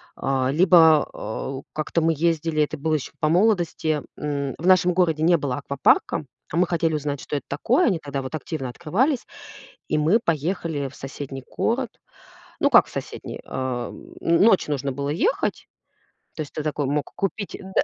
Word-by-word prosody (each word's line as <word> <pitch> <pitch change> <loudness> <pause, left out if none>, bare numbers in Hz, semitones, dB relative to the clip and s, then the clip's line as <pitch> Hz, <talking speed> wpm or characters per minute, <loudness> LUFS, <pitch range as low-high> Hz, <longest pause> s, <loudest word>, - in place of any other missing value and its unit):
а, 130 -1 0
либо, 160 -1 +6
а, 135 +4 -5
как-то 155 +2 -1
мы 165 +1 +3
ездили, 165 0 +1
это 155 +1 -3
было 155 +2 -1
еще 145 - -4
по 155 - +2
молодости, 170 -5 +2
м, 140 -2 -2
в 170 - -2
нашем 180 -1 +5
городе 165 -4 +2
не 170 +2 +5
было 140 -4 -2
аквапарка, 140 +1 +1 0.3
а 165 - -2
мы 180 +1 +3
хотели 165 -2 0
узнать, 145 -2 -2
что - - -4
это - - -7
такое. 240 - +2
Они 185 -8 +1
тогда 140 -2 -4
вот 130 +3 -5
активно 155 -4 -4
открывались, 210 - 0 0.6
и - - +1
мы 165 +10 +3
поехали 160 -2 -1
в 135 - -15
соседний 135 0 -7
город. - - -1 0.7
Ну, - - +3
как - - +7
в - - -15
соседний, - - -6
ам, 130 -2 -5
н 170 0 +3
ночь 205 -3 +5
нужно 140 -2 -1
было 140 +2 -3
ехать, 175 - 0 0.7
то - - -4
есть 150 - -6
ты - - -3
такой 150 -1 -1
мог 145 +1 -1
купить. 200 +1 -3
Э, - - -10
да. - - +4
155 Hz, 180 wpm, -23 LUFS, 140-170 Hz, 0.7 s, как